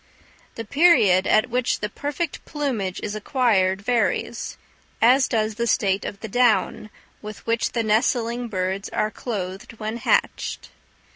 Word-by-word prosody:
The 230 Hz, -, -6 dB
period 215 Hz, -, +4 dB
at 215 Hz, -, +3 dB
which 250 Hz, 0 st, 0 dB
the 210 Hz, -, -2 dB
perfect 290 Hz, +7 st, -4 dB
plumage 245 Hz, -, -3 dB
is 210 Hz, -, -3 dB
acquired 205 Hz, -5 st, +1 dB
varies, 240 Hz, +1 st, -1 dB, 0.4 s
as 255 Hz, +3 st, +5 dB
does 220 Hz, -1 st, 0 dB
the 235 Hz, +2 st, -2 dB
state 195 Hz, -3 st, +1 dB
of 200 Hz, -, -6 dB
the 220 Hz, -, -5 dB
down 220 Hz, -1 st, +1 dB, 0.3 s
with 210 Hz, 0 st, -9 dB
which 230 Hz, 0 st, 0 dB
the 230 Hz, -, 0 dB
nestling 235 Hz, +2 st, +1 dB
birds 190 Hz, -1 st, -3 dB
are 215 Hz, -, -1 dB
clothed 195 Hz, -3 st, -5 dB
when 220 Hz, 0 st, -5 dB
hatched. -, -, -1 dB
220 Hz, 140 wpm, -23 LUFS, 205-245 Hz, 0.4 s, as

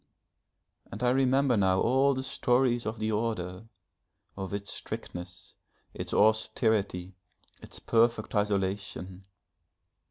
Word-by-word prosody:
And 105 Hz, +5 st, -6 dB
I 125 Hz, -, +4 dB
remember 135 Hz, 0 st, +3 dB
now 95 Hz, -2 st, +3 dB
all 135 Hz, +3 st, +3 dB
the 130 Hz, -, -3 dB
stories 125 Hz, -2 st, +1 dB
of 110 Hz, +1 st, -3 dB
the 110 Hz, +1 st, -1 dB
Order, 105 Hz, -3 st, -2 dB, 0.7 s
of 95 Hz, -1 st, -5 dB
its 100 Hz, 0 st, -4 dB
strictness, 90 Hz, +1 st, -8 dB, 0.4 s
its -, -, -5 dB
austerity, 110 Hz, -4 st, +2 dB, 0.5 s
its -, -, -12 dB
perfect 115 Hz, -1 st, +1 dB
isolation. 100 Hz, -2 st, -2 dB
110 Hz, 105 wpm, -29 LUFS, 95-120 Hz, 0.7 s, I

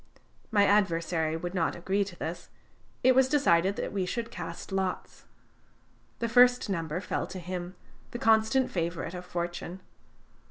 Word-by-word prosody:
My 205 Hz, -3 st, +4 dB
adversary 165 Hz, -5 st, +1 dB
would 175 Hz, +2 st, -5 dB
not 170 Hz, -4 st, 0 dB
agree 190 Hz, +4 st, 0 dB
to 190 Hz, -3 st, -9 dB
this. 170 Hz, +1 st, -6 dB, 0.5 s
It 260 Hz, +1 st, +6 dB
was 260 Hz, 0 st, +4 dB
decided 195 Hz, -, +3 dB
that -, -, -4 dB
we 190 Hz, -2 st, -1 dB
should 235 Hz, +3 st, -3 dB
cast -, -, -7 dB
lots. 190 Hz, -1 st, -3 dB, 0.9 s
The 230 Hz, -, -1 dB
first 245 Hz, -1 st, +5 dB
number 165 Hz, -2 st, -2 dB
fell -, -, -2 dB
to 190 Hz, -, -8 dB
him, 180 Hz, 0 st, -5 dB, 0.3 s
the -, -, -5 dB
constant 225 Hz, +3 st, +3 dB
favorite 170 Hz, -1 st, -3 dB
of 180 Hz, 0 st, -7 dB
fortune. 175 Hz, +1 st, -4 dB
185 Hz, 150 wpm, -29 LUFS, 170-220 Hz, 0.9 s, It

